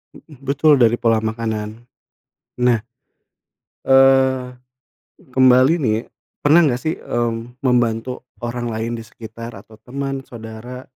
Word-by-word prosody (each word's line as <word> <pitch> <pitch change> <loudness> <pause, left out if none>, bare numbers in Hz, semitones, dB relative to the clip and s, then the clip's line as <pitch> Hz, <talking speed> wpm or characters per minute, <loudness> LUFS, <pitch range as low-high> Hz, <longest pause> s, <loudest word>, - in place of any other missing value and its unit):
Mhm, 150 -5 -16
betul 145 +1 +3
dari 120 -1 +4
pola 115 -2 +2
makanan. 110 0 -4 0.8
Nah, 120 -3 +3 1.1
eee, 135 -1 +5 0.9
kembali 130 +3 +5
nih, 110 -8 0 0.4
pernah 160 +3 +5
nggak 125 -3 0
sih, 160 +1 -1
mmm, 120 +1 -4
membantu 125 -1 0 0.2
orang 120 0 -3
lain 110 +1 -3
di 115 - -8
sekitar 115 +1 -10
atau 110 - -15
teman, 135 +3 -5
saudara, 120 +2 -9
120 Hz, 115 wpm, -20 LUFS, 115-135 Hz, 1.1 s, eee